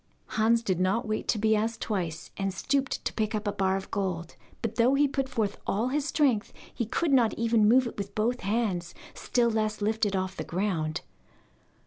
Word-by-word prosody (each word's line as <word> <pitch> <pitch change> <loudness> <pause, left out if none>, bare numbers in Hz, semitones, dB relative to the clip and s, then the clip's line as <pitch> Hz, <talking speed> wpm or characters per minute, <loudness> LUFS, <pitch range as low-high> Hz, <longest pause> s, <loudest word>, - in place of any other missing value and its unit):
Hans 230 +1 +2
did 185 -5 0
not 205 +6 +1
wait 215 0 -2
to - - +2
be 220 +1 +3
asked 225 +2 -1
twice, 170 -7 -3
and 195 0 -1
stooped 270 +8 -1
to - - -1
pick 220 0 -1
up 210 0 -3
a - - +2
bar 190 -2 +1
of 195 - -8
gold, 180 -4 -2 0.3
but 230 -1 -1
though 245 +3 +3
he 290 +1 +4
put 270 -1 -2
forth 220 -5 -1
all 225 +5 +1
his 285 +1 0
strength 265 -6 +1 0.2
he 235 - -2
could 295 +5 0
not 240 -4 +4
even 230 -2 +3
move 255 +2 +5
it 235 - -6
with 200 0 -5
both 235 +3 +1
hands, 190 -5 -1 0.2
still 235 -1 +1
less 215 -1 0
lift 220 +2 0
it 200 - -2
off 185 0 -2
the - - -3
ground. 170 -4 -1
215 Hz, 205 wpm, -28 LUFS, 195-235 Hz, 0.3 s, move